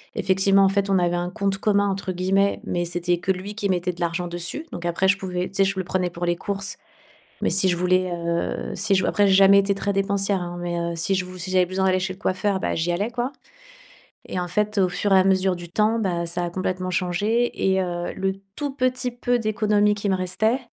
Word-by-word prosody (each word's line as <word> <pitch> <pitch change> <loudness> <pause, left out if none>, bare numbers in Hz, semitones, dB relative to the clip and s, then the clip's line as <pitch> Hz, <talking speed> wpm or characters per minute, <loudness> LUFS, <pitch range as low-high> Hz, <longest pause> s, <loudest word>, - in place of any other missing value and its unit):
effectivement 195 +1 +3
en 195 - +5
fait, 200 0 0
on 195 - +3
avait 175 -1 +1
un 175 0 -2
«compte 195 0 -1
commun» 205 -1 +2
entre 190 -1 -3
guillemets. 195 +2 +1
Mais 175 0 -1
c'était 175 0 -1
que 190 - 0
lui 190 +2 -4
qui 205 -2 -2
mettait 180 -1 0
de 175 - -12
l'argent 170 +1 -1
dessus. 175 - -1
Donc 175 - -7
après 175 +2 +1
je 200 +1 +4
pouvais, 180 -2 -3
tu - - -16
sais, 195 - +5
je 195 0 0
le 190 - -1
prenais 180 0 -1
pour 175 0 -5
les 175 0 +1
courses. 200 +2 -3 0.6
Mais - - +1
si 190 -1 +4
je 175 - +2
voulais, 185 +1 +1
heu, 170 0 -2
si 200 +1 +1
je 190 - +2
après 205 -1 +2
j'ai 195 - +4
jamais 195 +1 +7
été 200 0 +1
très 200 +1 -2
dépensière 195 0 +1
hein, 175 0 -5
mais 175 0 -3
heu, 170 0 -2
si 170 +4 0
je 185 -1 -1
vou 185 0 -10
si 175 - -5
j'avais 185 -1 +4
besoin 190 +2 -1
d'aller 185 0 +3
chez 185 0 -3
le 185 - -16
coiffeur, 190 0 0
bah, - - -1
j'y 165 +2 0
allais, 200 +7 -1
quoi 245 +2 -2 0.9
et - - -5
en 180 - -2
fait 210 +4 -1
au 185 -2 +4
fur 185 +3 -1
et 190 - +7
à 185 - +4
mesure 190 -1 +3
du 175 0 -9
temps, 215 +5 +1
bah, 175 -5 -1
ça 175 +1 -2
a 175 - -3
complètement 185 0 -3
changé 205 +7 0 0.2
et 190 - +2
heu, 175 -1 -3
le 190 0 -1 0.2
tout 290 -1 -2
petit 255 -1 0
peu 245 0 0
d'économie 210 -1 +2
qui 205 0 -3
me 190 - +2
restait, 205 +7 0
190 Hz, 250 wpm, -23 LUFS, 175-200 Hz, 0.9 s, jamais